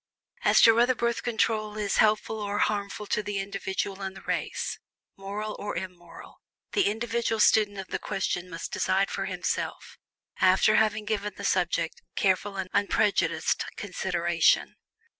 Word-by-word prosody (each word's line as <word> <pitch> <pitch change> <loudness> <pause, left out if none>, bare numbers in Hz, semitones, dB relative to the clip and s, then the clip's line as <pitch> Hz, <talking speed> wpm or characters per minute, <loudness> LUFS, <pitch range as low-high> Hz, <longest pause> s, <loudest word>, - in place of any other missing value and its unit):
As - - +5
to 225 - +9
whether 240 +3 +3
Birth 235 0 -1
Control 220 -2 0
is 205 -2 -1
helpful 215 0 +2
or 205 0 -2
harmful 205 0 -1
to 210 - 0
the 205 -1 -4
individual 195 0 -3
and 190 0 -5
the - - -12
race - - -3 0.4
moral 205 +2 -5
or 205 - -4
immoral 175 -2 -9 0.3
the 400 - +2
individual 230 +1 -1
student 210 -1 +4
of 190 -1 -7
the - - -2
question 180 -1 -2
must 165 -1 -6
decide 195 +1 +1
for - - -2
himself - - -3 0.4
after - - +4
having 215 -1 +2
given 210 -1 -2
the - - -6
subject 170 -3 0
careful 195 +1 +1
and 185 -1 -4
unprejudiced 205 0 +1
consideration. 170 -4 +1
205 Hz, 145 wpm, -27 LUFS, 190-215 Hz, 0.4 s, to